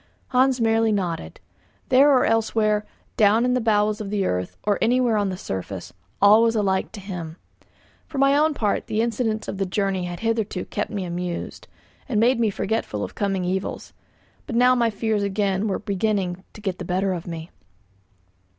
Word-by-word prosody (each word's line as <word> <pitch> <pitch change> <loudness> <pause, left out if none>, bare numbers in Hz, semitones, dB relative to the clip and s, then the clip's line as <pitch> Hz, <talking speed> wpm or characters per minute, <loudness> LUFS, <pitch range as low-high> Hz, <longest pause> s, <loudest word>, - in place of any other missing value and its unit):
Hans 260 0 +3
merely 225 -1 +2
nodded. 170 - -3 0.5
There 270 +3 +6
or 260 -2 +4
elsewhere, 215 -1 +1 0.3
down 215 +3 +4
in 250 - +2
the 255 - +1
bowels 215 -1 +1
of 200 - -5
the 200 -2 0
earth, 90 - -2
or 205 -1 +1
anywhere 245 -1 +3
on 205 -2 +1
the 185 - -4
surface, 95 - -6 0.3
all 205 +2 +7
was 230 0 +3
alike 195 -3 0
to 215 - -7
him. 180 -4 -7 0.7
For 305 - -7
my 275 +1 +4
own 305 +1 +3
part 210 -3 -1
the 220 -1 -1
incidents 225 -2 -1
of 195 - -5
the 195 - +1
journey 190 -1 -1
had 175 -1 -6
hitherto 225 -4 -1
kept 210 - -3
me 200 -4 -3
amused, 175 0 -5 0.4
and 220 -5 +1
made 240 +2 +3
me 225 -2 +3
forgetful 195 - -2
of - - -6
coming 195 -3 -1
evils; 190 +1 -3 0.5
but 235 - -4
now 250 +1 +5
my 235 -2 +2
fears 215 0 -1
again 200 0 0
were 195 - 0
beginning 195 -3 -1
to 215 - -12
get 190 -3 -3
the - - -4
better 185 +2 0
of 175 -1 -6
me. 165 0 -7
210 Hz, 185 wpm, -23 LUFS, 190-225 Hz, 0.7 s, all